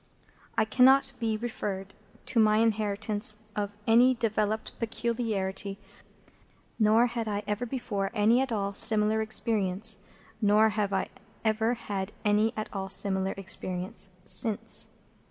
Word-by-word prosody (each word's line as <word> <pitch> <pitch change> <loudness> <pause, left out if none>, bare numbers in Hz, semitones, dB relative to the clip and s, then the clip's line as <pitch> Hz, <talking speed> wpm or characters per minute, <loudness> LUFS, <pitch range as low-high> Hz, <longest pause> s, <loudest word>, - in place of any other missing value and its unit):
It 220 -1 0
cannot 265 +2 +4
be 225 -2 -1
referred 200 -4 -5 0.3
to 245 - 0
my 215 -1 +4
inheritance 215 -1 0 0.2
of 205 0 -4
any 245 +3 +4
developed 220 -2 -2
peculiarity, 215 -4 -3 1.0
nor 220 +2 +4
had 235 -2 -4
I 205 0 -3
ever 210 +4 -3
before 210 -6 -3
any 230 +2 +2
at 265 -2 -3
all 200 -2 -2
similar 215 +1 +7
experience, 215 -1 0 0.4
nor 210 +1 +4
have 210 -2 -2
I 195 - -2 0.4
ever 220 +2 +1
had 200 -3 -5
any 210 +2 +2
at 215 - -3
all 195 -1 -5
similar 190 0 +2
experience 185 -1 -2 0.2
since. 220 -3 +1
215 Hz, 125 wpm, -27 LUFS, 200-225 Hz, 1.0 s, similar